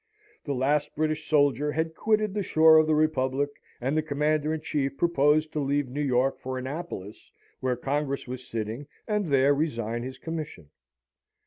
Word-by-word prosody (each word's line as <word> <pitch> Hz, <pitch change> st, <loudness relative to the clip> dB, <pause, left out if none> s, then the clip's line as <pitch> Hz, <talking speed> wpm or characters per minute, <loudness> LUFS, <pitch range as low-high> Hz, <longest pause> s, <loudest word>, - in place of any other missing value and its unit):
The 140 Hz, -3 st, -2 dB
last 140 Hz, +3 st, 0 dB
British 155 Hz, +1 st, -1 dB
soldier 145 Hz, -1 st, +3 dB
had 160 Hz, 0 st, -1 dB
quitted 215 Hz, +1 st, +1 dB
the 210 Hz, -, -1 dB
shore 160 Hz, -3 st, +6 dB
of 155 Hz, -, +3 dB
the 155 Hz, -, +3 dB
Republic, 145 Hz, -2 st, +1 dB, 0.3 s
and 135 Hz, +4 st, -1 dB
the 155 Hz, -, +3 dB
Commander 150 Hz, 0 st, 0 dB
in 160 Hz, -1 st, -2 dB
Chief 140 Hz, -3 st, -2 dB
proposed 155 Hz, -1 st, +2 dB
to 155 Hz, -, -1 dB
leave 140 Hz, -1 st, 0 dB
New 140 Hz, +4 st, -3 dB
York 135 Hz, -1 st, +1 dB
for 130 Hz, 0 st, -4 dB
Annapolis, 130 Hz, -, -6 dB, 0.3 s
where 130 Hz, -1 st, 0 dB
Congress 140 Hz, +2 st, -2 dB
was 125 Hz, 0 st, -7 dB
sitting, 115 Hz, +5 st, -4 dB, 0.2 s
and 210 Hz, -4 st, 0 dB
there 140 Hz, -1 st, +4 dB
resign 120 Hz, -6 st, -2 dB
his 130 Hz, +2 st, -6 dB
commission. 150 Hz, -, -6 dB
145 Hz, 165 wpm, -27 LUFS, 130-155 Hz, 0.3 s, shore